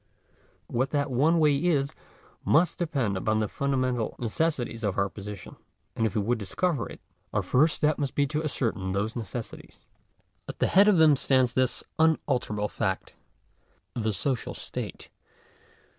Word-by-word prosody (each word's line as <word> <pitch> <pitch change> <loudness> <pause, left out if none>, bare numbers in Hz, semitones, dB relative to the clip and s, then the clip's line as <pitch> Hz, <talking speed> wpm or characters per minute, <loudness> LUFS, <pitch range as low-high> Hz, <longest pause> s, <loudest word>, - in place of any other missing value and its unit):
What 130 +3 -1
that 145 -2 -1
one 150 +7 +3
way 150 -3 +4
is 140 -3 +1 0.5
must 165 +2 +3
depend 140 - 0
upon 110 +3 0
the 110 - 0
fundamental 130 -4 -1
necessities 120 -1 -1
of 100 -3 -1
our 100 0 +1
position. 100 -1 -9 0.4
And 110 - +1
if 100 - -6
we 105 - +2
would 120 +2 0
discover 130 - -1
it, - - -10 0.3
our - - 0
first 150 +5 +3
step 155 0 +1
must 140 -2 -2
be 145 - +3
to 150 +3 -2
ascertain 110 -10 -2
those 105 +3 -1
necessities. 115 0 -7 0.7
At - - -6
the - - +2
head 200 +3 +5
of 205 -4 +5
them 155 -2 +6
stands 130 -3 +2
this 130 -1 +1 0.2
unalterable 125 -9 +1
fact - - -3 0.4
— - - -41
the 110 -2 -1
social 125 +5 -2
I - - -10
state. - - -6
130 Hz, 160 wpm, -27 LUFS, 110-150 Hz, 0.7 s, them